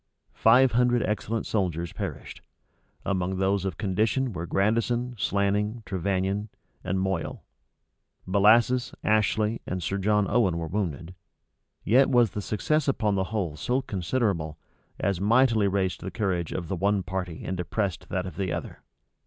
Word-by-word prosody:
Five 125 +3 +5
hundred 120 0 +3
excellent 110 +1 -2
soldiers 85 -5 -1
perished. - - -6 0.6
Among 95 -1 -1
those 95 0 +1
of 95 -5 -3
condition 110 +5 0
were 85 -1 -5
Grandison, 115 +6 +1
Slanning, 105 +2 0
Trevannion, 95 +2 -1 0.3
and 95 +1 -1
Moyle; 95 -2 -2 0.8
Bellasis, 110 +6 +4
Ashley, 110 +1 +1
and 90 -1 -3
Sir 100 +3 -2
John 105 +1 +2
Owen 100 -6 +2
were 85 - -3
wounded; 85 -2 -3 0.7
yet 130 +6 +4
was 120 -6 +4
the 105 - -4
success 150 +10 0
upon 110 -6 +1
the 95 -1 0
whole 95 -7 -3
so 125 - -1
considerable, 90 - -1 0.4
as 95 -2 0
mightily 115 0 +4
raised 95 -1 -1
the 95 - -4
courage 95 -6 -2
of 85 - -4
the 95 - -2
one 100 +2 +1
party 90 -2 -4
and 95 - -2
depressed 95 +1 -3
that 95 0 -2
of 90 - -8
the 95 -3 -1
other. - - -5
100 Hz, 145 wpm, -26 LUFS, 95-110 Hz, 0.8 s, Five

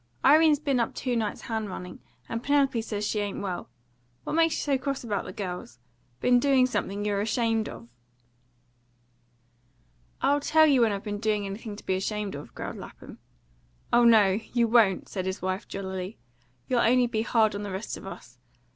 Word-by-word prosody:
"Irene's 310 0 +6
been 280 -3 0
up 235 - -1
two 250 -2 -2
nights 220 -3 -2
hand 220 -2 -3
running, 180 -1 -7 0.3
and 230 - -3
Penelope 275 -3 +2
says 210 -2 -3
she 210 - -1
ain't 205 -1 -3
well. 185 -7 -4 0.5
What - - -4
makes 330 0 +3
you - - -2
so 280 -2 +1
cross 275 0 -3
about 210 -4 -2
the - - -6
girls? 180 - -6 0.4
Been 245 0 +4
doing 265 -1 +4
something 205 -5 -2
you're 200 -1 0
ashamed 225 0 0
of?" 115 - -10 2.3
"I'll 285 +1 +2
tell 315 +2 +4
you 275 -5 +4
when 225 -2 +4
I've 200 -1 -4
been 205 -1 -4
doing 210 -2 0
anything 205 +2 -6
to - - -13
be - - 0
ashamed 205 +2 -2
of," 145 +1 -9
growled - - -6
Lapham. - - -11 0.7
"Oh 240 0 +6
no, 210 -4 +5
you 235 -1 +3
won't!" 220 -5 +3
said 185 -2 -4
his 190 - -3
wife 185 +2 -3
jollily. 190 0 -5 0.5
"You'll 250 - +1
only 245 +2 +4
be 230 -2 -1
hard 225 -1 +2
on 200 - -4
the 205 - -5
rest 190 +3 -4
of - - -10
us. 125 -9 -11
220 Hz, 185 wpm, -27 LUFS, 195-245 Hz, 2.3 s, Irene's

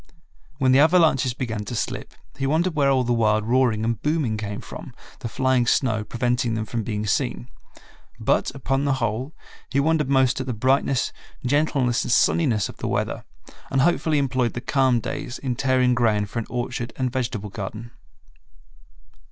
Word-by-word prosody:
When 130 -2 +3
the 130 - +6
avalanches 155 -6 +4
began 110 -5 -3
to 120 - -5
slip, - - -4 0.2
he 135 - -2
wondered 165 +5 +1
where 145 -2 +2
all 130 -2 +3
the 120 0 +1
wild 110 -2 +2
roaring 120 -2 +2
and 115 -1 -1
booming 150 -7 0
came 105 -1 -4
from, - - -10 0.2
the - - -4
flying 130 -1 +1
snow 110 -4 +2
preventing 120 +1 -1
them 110 -1 -2
from 115 +2 -3
being 105 -1 -3
seen. - - -1 0.7
But, - - +1
upon 135 +1 -1
the 140 - +2
whole, 125 +4 -2 0.3
he 140 - +1
wondered 150 -1 +1
most 130 -1 +3
at 130 - -6
the 125 - -2
brightness, 130 +3 +1 0.3
gentleness, 135 -3 +1
and - - -3
sunniness 120 - +3
of - - -11
the - - -4
weather, - - -2 0.4
and 135 - +2
hopefully 160 0 +2
employed 130 -4 0
the - - -3
calm 130 -3 +2
days 130 0 -5
in 130 -3 -3
tearing 130 -1 +2
ground 105 -4 +1
for 115 - -2
an 115 - -5
orchard 120 0 -3
and 130 -2 -1
vegetable 115 -6 -3
garden. 110 +2 -6
125 Hz, 175 wpm, -23 LUFS, 115-135 Hz, 0.7 s, the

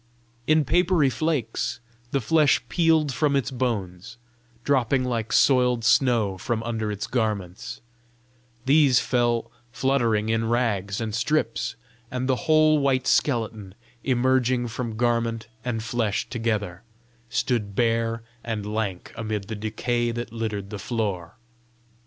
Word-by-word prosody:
In 155 -1 +4
papery 175 -2 +3
flakes 120 -5 -1 0.3
the 140 - 0
flesh 150 +4 +4
peeled 160 -5 +2
from 145 +1 +1
its 135 -1 0
bones, 115 -4 -3 0.5
dropping 130 -1 +2
like 115 -3 -2
soiled 125 -3 +3
snow 110 -5 +3
from 115 +3 -2
under 110 -2 -2
its 105 0 -4
garments; 105 -7 -3 0.8
these 140 -2 +5
fell 120 -2 0 0.2
fluttering 120 -5 +1
in 115 0 0
rags 105 -5 0
and 110 -2 -3
strips, 120 0 0 0.3
and 125 0 -3
the 130 - +3
whole 155 -1 +5
white 135 -2 +1
skeleton, 110 -9 0 0.3
emerging 125 -1 +2
from 115 -1 -4
garment 115 -1 0 0.2
and 115 -3 -2
flesh 115 -3 -1
together, 105 -6 -2 0.5
stood 105 -6 -1
bare 115 0 +1 0.2
and 110 -3 -3
lank 100 -5 -3
amid 110 -3 -4
the 110 - -3
decay 120 +3 -1
that 120 -1 -5
littered 105 -4 -4
the 105 - -5
floor. 100 -6 -3
115 Hz, 125 wpm, -25 LUFS, 110-130 Hz, 0.8 s, these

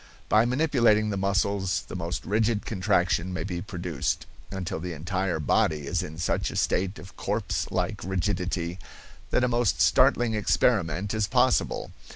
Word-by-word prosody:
By 110 +2 +5
manipulating 120 -6 +3
the - - -1
muscles 95 -2 0
the - - -7
most 85 -1 -4
rigid 110 +2 +1
contraction 90 -3 +1
may 90 - -3
be 90 -3 -4
produced, 90 -6 -3 0.2
until 95 -4 -4
the 90 +1 -5
entire 90 +2 -2
body 75 0 +1
is - - -1
in 80 +1 -7
such 90 - 0
a - - -7
state 95 +2 0
of 95 - -12
corpse 105 +1 -2
like - - -2
rigidity 90 -2 -2 0.5
that 125 - +2
a - - +4
most 120 -2 +1
startling 120 -2 +4
experiment 100 -3 +1
is 110 -2 0
possible. - - +1
95 Hz, 155 wpm, -27 LUFS, 90-105 Hz, 0.5 s, By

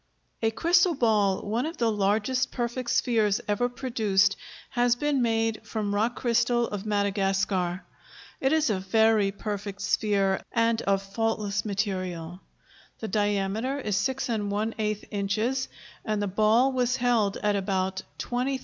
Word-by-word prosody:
A 225 - +3
crystal 340 +8 +3
ball, 210 -6 +2
one 235 +7 0
of 330 +1 -7
the 230 -2 +2
largest 210 +5 +1
perfect 240 0 -3
spheres 215 -4 +2
ever 210 +4 +1
produced, 215 -6 +1 0.4
has 245 0 +2
been 285 +1 0
made 225 -1 0
from 210 -2 -3
rock 220 +4 +1
crystal 240 0 +1
of 205 0 -5
Madagascar. 195 -3 0 0.6
It 265 - +1
is 315 -6 +2
a 195 - 0
very 215 +1 +3
perfect 200 -1 -5
sphere 200 -3 +1
and 230 0 +2
of 195 0 +1
faultless 210 0 -1
material. 185 -4 -3 0.6
The 220 - -5
diameter 205 +6 0
is 210 -7 -2
6⅛ 215 -2 -1
inches 215 +6 -1 0.4
and 215 -1 -1
the 205 - -1
ball 220 +7 +3
was 250 -1 +1
held 235 -6 +1
at 210 -1 +2
about 190 -1 -1 0.2
$20,000. 255 +2 -2
215 Hz, 135 wpm, -27 LUFS, 200-240 Hz, 0.6 s, A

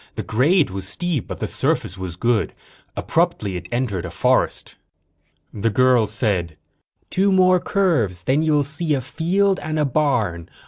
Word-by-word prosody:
The - - -4
grade 145 - +2
was 95 0 -5
steep 170 - -2
but - - -7
the - - 0
surface - - -1
was 95 -3 -6
good. 115 +3 0 0.4
Abruptly, 160 - 0
it 90 0 -7
entered 120 -8 -1
a 90 - -5
forest. - - 0 0.8
The 110 +2 0
girl 125 0 +3
said: 95 -7 -1 0.5
"Two 195 +1 +2
more 185 -1 +4
curves. 140 - 0
Then 135 +4 +2
you'll 150 -2 +2
see 155 +2 -1
a 135 - -2
field 185 +10 0
and 155 0 -4
a 150 - +2
barn. 120 - 0
130 Hz, 155 wpm, -21 LUFS, 100-165 Hz, 0.8 s, more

